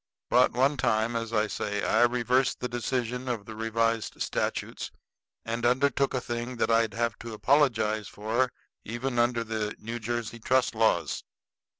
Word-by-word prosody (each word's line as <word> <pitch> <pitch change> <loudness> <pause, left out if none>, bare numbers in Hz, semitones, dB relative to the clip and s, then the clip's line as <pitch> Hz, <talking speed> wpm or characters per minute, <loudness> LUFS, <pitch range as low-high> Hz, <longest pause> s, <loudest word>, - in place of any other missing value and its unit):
But, 125 +1 +5
one 135 +4 +2
time, 115 -1 +1
as 115 -1 -2
I 110 -1 +2
say, 105 -1 -3
I 110 - +3
reversed 125 +2 +1
the 125 - -2
decision 125 +1 -2
of 115 -5 -2
the 110 - -8
revised 115 0 0
statutes - - -2 0.6
and 115 +1 -3
undertook 135 +2 +2
a - - +1
thing 120 +1 -4
that 115 - +1
I'd 115 -2 +2
have 115 -1 -1
to 115 -1 -7
apologize 110 -3 +2
for 115 +5 0 0.3
even 120 +2 -2
under 120 0 +2
the 110 -2 -3
New 115 +2 -5
Jersey 120 0 -3
trust 130 +3 +2
laws. 110 0 +1
115 Hz, 160 wpm, -28 LUFS, 110-125 Hz, 0.6 s, But